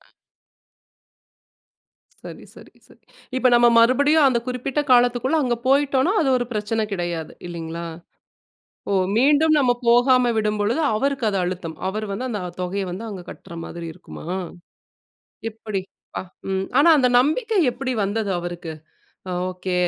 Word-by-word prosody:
அ. - - -27 2.2
சரி, - - -9
சரி, - - -15
சரி. - - -22 0.3
இப்ப 260 0 +3
நம்ம 240 0 +6
மறுபடியும் 285 +5 +5
அந்த 240 -2 +1
குறிப்பிட்ட 255 +3 -2
காலத்துக்குள்ள 245 +4 +3
அங்க 240 -2 0
போய்ட்டோன்னா, 275 +4 +3
அது 280 - +1
ஒரு 245 - -1
பிரச்சனை 215 +1 -1
கிடையாது 175 -4 -3
இல்லைங்களா? 170 0 -6 1.1
ஓ! - - +2 0.2
மீண்டும் 300 +4 +4
நம்ம 255 -4 +3 0.2
போகாம 245 0 +4
விடும்பொழுது 215 +6 0
அவருக்கு 270 +2 0
அது 195 - -1
அழுத்தம். 175 -3 -4
அவரு 215 +2 -4
வந்து 235 +6 -3
அந்த 210 - -3 0.2
தொகைய 190 +2 -2
வந்து 195 +6 -6
அங்க 190 -3 -7
கட்ற - - -12
மாதிரி 170 -1 -7
இருக்குமா? - - -12 1.2
எப்டி 215 -3 -5 0.3
ப்பா! - - -4 0.3
ம். 190 0 -1
ஆனா, 315 - +6
அந்த 255 -3 +4
நம்பிக்கை 425 - +1
எப்டி 255 0 -3
வந்தது 205 +1 -2
அவருக்கு? 175 -2 -6 0.6
அ - - -3 0.2
ஓகே 185 0 -5
235 Hz, 135 wpm, -22 LUFS, 190-265 Hz, 2.2 s, நம்ம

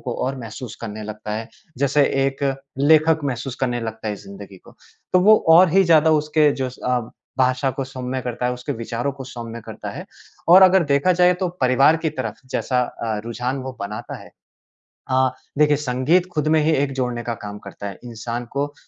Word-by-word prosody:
को 125 - -4
और 135 +1 -2
महसूस 115 0 -8
करने 110 -2 -6
लगता 105 0 -6
है। 110 +1 -4 0.3
जैसे 140 +2 +2 0.3
एक 135 +1 -4 0.4
लेखक 155 +2 +4
महसूस 130 -1 -3
करने 120 -2 0
लगता 110 -1 -5
है 105 - -2
ज़िंदगी 195 - -11
को। - - -16 0.4
तो 185 - +6
वो 215 +4 +7
और 170 +3 +8
ही 195 +1 +5
ज़्यादा 160 -2 +5
उसके 150 0 +3
जो 130 -2 -3
स 125 - -15
अ, 125 -1 +1 0.4
भाषा 130 +1 +2
को 135 +1 -4
सौम्य 130 -1 -5
करता 125 0 -3
है, 125 - 0
उसके 125 0 -5
विचारों 115 +3 -3
को 135 -1 -9
सौम्य 115 -3 -8
करता - - -7
है। - - -7 0.4
और 185 +3 +9
अगर 185 -1 +6
देखा 140 +5 +2
जाए 180 +1 +4
तो 185 -1 0
परिवार 135 +4 +4
की 160 -1 -2
तरफ़ 120 -7 -5
जैसा 125 -1 0
अ, 115 -3 -4
रुझान 125 +3 -3
वो 130 - -6
बनाता 105 +4 -6
है। - - -15 0.8
अ, 130 0 +3 0.3
देखिए 150 -1 +4
संगीत 145 +6 +1
खुद 155 -2 0
में 155 - +4
ही 160 - +3
एक 140 -1 +1
जोड़ने 125 -2 -2
का 115 -1 -3
काम 105 0 -6
करता 100 - -9
है। 100 - -9
इंसान 120 +1 -5
को 145 +1 -2
130 Hz, 200 wpm, -21 LUFS, 120-150 Hz, 0.8 s, और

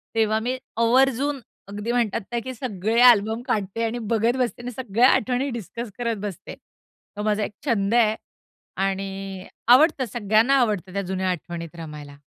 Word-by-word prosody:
तेव्हा 220 -1 +2
मी 260 +1 -1 0.2
आवर्जून, 265 +4 +2 0.3
अगदी 205 +3 -4
म्हणतात 235 -3 0
ना, 240 - 0
की 260 - -5
सगळे 225 -2 -2
अल्बम 220 +1 0
काढते 210 +2 -1
आणि 230 +2 -3
बघत 230 +3 +2
बसते 240 -1 -1
आणि 245 +1 -5
सगळ्या 240 0 +2
आठवणी 255 +4 +1
डिस्कस 230 +2 -7
करत 235 -2 -1
बसते. 190 -5 -8
तो 210 - -13
माझा 210 0 +1
एक - - -3
छंद 215 -5 +1
आहे, 225 -3 +4 0.6
आणि 195 0 -3 0.2
आवडतं 270 +2 +5
सगळ्यांना 225 +4 +3
आवडतं 205 -6 0
त्या 200 - -1
जुन्या 190 0 -2
आठवणीत 170 -1 -5
रमायला. 150 -3 -9
220 Hz, 155 wpm, -24 LUFS, 195-240 Hz, 0.6 s, आवडतं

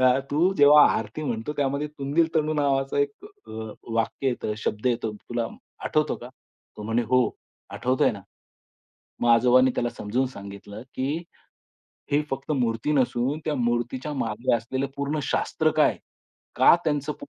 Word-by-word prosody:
हां, 130 0 +5
तू 170 +6 +3
जेव्हा 145 -2 +8
आरती 110 +8 -4
म्हणतो 115 -1 -3
त्यामध्ये 140 +1 0
तुंदिल 150 +3 0
तणू 155 -1 +1
नावाचा 140 -2 +1
एक 175 - -1
अ, 410 0 -16 0.4
वाक्य 115 +4 -1
येतं, 120 -3 -2
शब्द 110 +1 -3
येतो 115 -3 0
तुला 120 +2 -4
अ, - - -4 0.4
आठवतो - - +1
का?" - - -10 0.5
तो 105 - -7
म्हणे 115 +3 0
"हो 125 -1 +5 0.4
आठवतोय 130 +1 +1
ना." - - -8 1.0
मग 120 - +1
आजोबांनी 125 +2 +5
त्याला 120 - 0
समजून 120 +6 -1
सांगितलं, 100 -2 -9
की 145 +6 -2 0.9
"हे 145 +1 +3
फक्त 135 +3 -3
मूर्ती 120 0 0
नसून 130 0 +1
त्या 155 - -1
मूर्तीच्या 120 +4 -1
मागे 120 -2 0
असलेलं 130 +4 -3
पूर्ण 140 +2 -2
शास्त्र - - 0
काय? - - +4 0.6
का - - +7
त्यांचं 150 -1 0
पोट 285 - -12
130 Hz, 155 wpm, -25 LUFS, 120-145 Hz, 1.0 s, जेव्हा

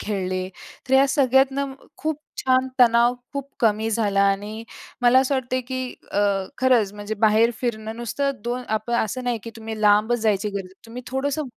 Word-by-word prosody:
खेळले. 185 -3 -2 0.4
तर 265 - +3
या 270 +1 +6
सगळ्यातनं 270 0 +2 0.2
खूप 310 -1 -3 0.2
छान 260 0 +3
तणाव 235 0 +5 0.2
खूप 280 -1 -5
कमी 220 -1 +2
झाला 205 -3 +1
आणि 210 +3 -4 0.4
मला 245 +1 +6
असं 270 +1 0
वाटतंय 255 -1 -1
की 255 0 -5 0.2
अ, 205 - +1 0.4
खरंच 245 -6 +3
म्हणजे 205 +1 -5
बाहेर 220 +2 +4
फिरणं 220 -2 -3
नुसतं 240 +4 -1
दोन 245 +1 -2
आपण 220 +2 -1
असं 250 +4 -5
नाही 245 -2 0
की 230 - -6
तुम्ही 220 -1 -6
लांबच 210 +3 +4
जायची 210 -1 +1
गरज 200 -1 -4
आहे. 190 - -30
तुम्ही 240 +2 -8
थोडंसं 280 +4 -2
235 Hz, 170 wpm, -23 LUFS, 215-260 Hz, 0.4 s, या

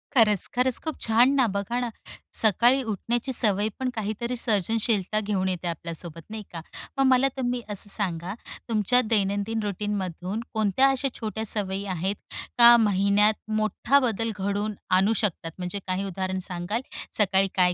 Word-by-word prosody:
खरंच, 210 -6 +4
खरंच. 250 0 +2
खूप 315 -1 -4
छान 235 +4 +4
ना, 265 -2 +4
बघा 200 +4 -2
ना, 245 -1 -2 0.5
सकाळी 235 +5 +4
उठण्याची 235 +4 -2
सवय 210 -2 +2
पण 260 -1 -1
काहीतरी 220 +3 -3
सर्जनशीलता 215 -1 0
घेऊन 200 -3 -1
येते 180 -1 -3
आपल्यासोबत, 165 0 -6
नाही 220 0 -6
का? 165 - -5 0.4
मग 270 - +3
मला 255 +1 +4
तुम्ही 245 -1 -1
असं 205 0 -4
सांगा, 180 -3 -2 0.4
तुमच्या 230 +3 +3
दैनंदिन 205 +2 0
रुटीनमधून 200 -1 -3
कोणत्या 220 +5 +3
अशा 270 +1 0
छोट्या 220 0 -4
सवयी 200 -1 -1
आहेत 190 +5 -1 0.4
का 240 0 +9
महिन्यात 205 0 +3 0.2
मोठा 215 +6 +2
बदल 230 -3 0
घडवून 205 +2 -2 0.2
आणू 205 +4 +3
शकतात? 165 -4 -2
म्हणजे 180 +2 -4
काही 185 +1 -1
उदाहरण 190 0 -3
सांगाल? 180 +6 -2 0.4
सकाळी 195 -2 +3
काय 180 -1 +4
210 Hz, 150 wpm, -26 LUFS, 190-230 Hz, 0.5 s, का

